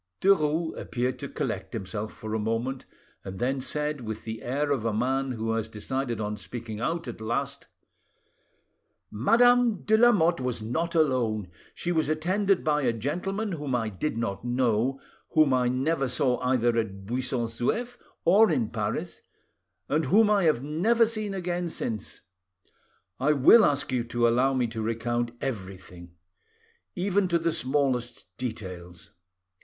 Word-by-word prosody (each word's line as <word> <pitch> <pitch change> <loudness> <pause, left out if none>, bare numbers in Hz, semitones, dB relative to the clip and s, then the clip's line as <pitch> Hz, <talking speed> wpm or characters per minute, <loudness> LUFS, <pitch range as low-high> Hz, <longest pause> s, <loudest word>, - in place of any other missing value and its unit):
Derues 160 -4 +2
appeared 125 +1 -2
to - - -5
collect - - -4
himself 105 +3 -4
for 110 0 -7
a 110 - 0
moment, 115 +5 -2 0.4
and 95 0 -7
then 130 +4 -1
said 150 +1 -2
with 110 -1 -6
the 110 0 -6
air 145 +4 -1
of 135 -6 0
a 115 - 0
man 130 +4 0
who 115 -1 -2
has 115 -1 -2
decide 120 +2 -3
on 105 0 -2
speaking 115 -1 -7
out 165 +6 -2
at 115 -2 -7
last— 115 +2 -3 1.4
"Madame 235 - +4
de 220 - +3
Lamotte 205 - +4
was 125 -2 -2
not 160 +11 -2
alone; 115 - +1 0.2
she 175 - -2
was 160 -4 +1
attended 185 +5 +1
by 150 -1 +2
a 125 -4 +2
gentleman 180 - -3
whom 145 -6 -2
I 115 -2 -1
did 110 +5 -3
not 105 -3 -3
know, 125 +1 +1 0.3
whom 155 -4 +5
I 125 -1 +2
never 135 +3 0
saw 125 0 +1
either 125 -2 +1
at 100 -3 -4
Buisson 125 +1 -1
Souef 230 - -2 0.3
or 205 +6 +6
in 130 -9 0
Paris, - - -3 0.7
and 155 +2 +1
whom 210 +8 +4
I 200 -4 +3
have 150 -6 +2
never 205 +11 +3
seen 215 -3 -3
again 175 -1 -2
since. 110 -9 -5 1.0
I 145 +4 +3
will 150 - +7
ask 145 -4 +1
you 125 -2 0
to 120 0 +1
allow 130 +3 +2
me 125 -2 +2
to 115 -1 -4
recount 115 +2 -1
everything; 95 -6 -7 0.8
even 195 +1 +1
to 170 -1 +2
the 165 0 0
smallest 130 -5 -1
details. 90 -8 -7
130 Hz, 155 wpm, -27 LUFS, 115-165 Hz, 1.4 s, will